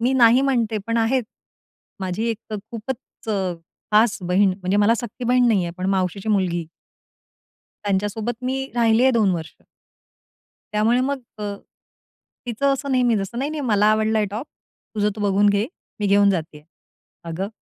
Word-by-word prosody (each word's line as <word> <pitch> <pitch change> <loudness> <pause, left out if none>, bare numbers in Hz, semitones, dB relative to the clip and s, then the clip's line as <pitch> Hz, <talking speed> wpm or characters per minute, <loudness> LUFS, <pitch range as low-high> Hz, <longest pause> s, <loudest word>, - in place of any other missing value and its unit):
मी 250 +3 +2
नाही 245 -1 +6
म्हणते, 235 -5 +1
पण 230 0 0
आहेत. 245 +3 +2 0.8
माझी 190 +4 -2
एक 225 0 -7 0.2
खूपच 235 +1 -7 0.6
खास 220 +1 +4
बहीण, 190 +3 +3
म्हणजे 185 +2 0
मला 210 +3 +4
सख्खी 240 +1 -6
बहीण 250 0 +4
नाही 200 -5 +3
आहे, 170 - -4
पण 185 +1 -3
मावशीची 190 +2 -2
मुलगी. 180 -5 +1 1.2
त्यांच्यासोबत 210 +5 -2
मी 265 +1 -1
राहिले 230 0 +3
आहे, 265 - +6
2 215 -4 +3
वर्ष. 160 -1 -6 1.2
त्यामुळे 225 +4 +3
मग 270 +1 -1 0.2
अ, - - -6 1.0
तिचं 275 +4 +1
असं 275 0 -2
नेहमी 245 -3 +3
जसं, 200 +4 -3
"नाही, 275 +3 -1
नाही 310 -1 -4
मला 210 -5 +2
आवडलाय 215 0 +2
टॉप, 225 +8 -5 0.5
तुझं 210 0 +1
तो 215 - -6
बघून 205 0 +3
घे, 205 +2 +1 0.3
मी 205 - +1
घेऊन 200 0 +5
जाते 160 -5 -3
आहे." 150 - -22 0.6
अगं 190 +5 -3
220 Hz, 155 wpm, -22 LUFS, 200-245 Hz, 1.2 s, नाही